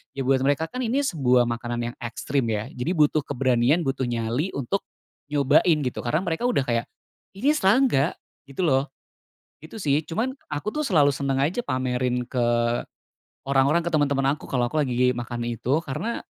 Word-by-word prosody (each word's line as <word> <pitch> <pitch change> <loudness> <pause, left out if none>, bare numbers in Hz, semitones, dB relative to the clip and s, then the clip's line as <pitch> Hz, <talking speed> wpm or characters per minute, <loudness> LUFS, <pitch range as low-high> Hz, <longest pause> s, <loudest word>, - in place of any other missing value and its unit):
ya 135 - -2
buat 130 -1 +3
mereka 145 +4 +1
kan 255 +6 -4
ini 255 +5 +1
sebuah 130 - +3
makanan 120 0 -3
yang - - -25
ekstrim 120 +2 -2
ya 105 +2 -2
jadi 125 +7 -2
butuh 150 -1 +3
keberanian 130 +2 +2
butuh 135 0 -1
nyali 120 +7 -1
untuk, 140 +9 -2 0.4
nyobain 150 +2 +3
gitu 125 - -3
karena 155 +9 -1
mereka 175 +7 -1
udah 240 - +1
kayak, 120 -2 -1 0.5
ini 260 +9 +2
serangga 205 - +3 0.3
gitu 140 +6 -4
loh, 135 -4 +2 0.8
itu 160 +8 -10
sih 150 -5 +1
cuman 225 +12 -2 0.2
aku 150 +8 -3
tuh 305 - 0
selalu 150 - +3
seneng 135 0 -1
aja 160 - 0
pamerin 125 - -1
ke, 120 -2 +1 0.9
orang-orang, 140 +4 +2
ke 170 - -3
temen-temen 140 -3 +2
aku - - -11
kalo 120 -2 0
aku 155 - -1
lagi 125 -3 +2
makan 120 -1 -4
itu 120 +6 -1
karena, 170 - -4
140 Hz, 170 wpm, -24 LUFS, 125-165 Hz, 0.9 s, buat